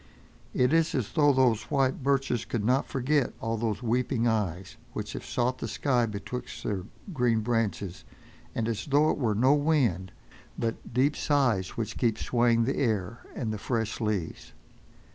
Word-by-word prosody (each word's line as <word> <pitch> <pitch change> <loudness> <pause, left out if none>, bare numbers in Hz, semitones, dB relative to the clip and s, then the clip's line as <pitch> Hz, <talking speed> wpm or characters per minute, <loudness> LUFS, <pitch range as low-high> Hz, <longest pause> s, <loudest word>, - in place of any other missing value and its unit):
It 125 +3 +3
is 165 -1 +3
as 125 -6 -1
though 145 -3 +4
those 125 -5 +3
white 135 -1 +1
birches 135 -3 +1
could 110 -3 -3
not 130 +4 +2
forget 140 +2 0
all 115 0 -2
those 115 +1 -2
weeping 120 +1 +1
eyes, 95 -5 -1 0.2
which - - -5
have - - -6
sought 125 +1 -1
the - - -3
sky 125 -5 +1
betwixt 115 +4 -6
their 95 -4 -2 0.3
green 120 -5 +2
branches, 105 -5 -1 0.5
and 115 - 0
as 115 +2 -3
though 145 +2 +4
it - - -3
were 110 -6 +1
no 130 +6 +4
wind, 135 - +1 0.5
but 115 0 -3
deep 135 +5 +2
sighs 125 -11 +1
which 110 -2 -3
keep 115 -3 +2
swaying 120 -1 +2
the 135 +4 -1
air 110 -3 0 0.2
and 110 -4 -2
the 105 - -5
fresh 110 0 -2
leaves. 105 -7 -3
120 Hz, 165 wpm, -28 LUFS, 110-130 Hz, 0.5 s, though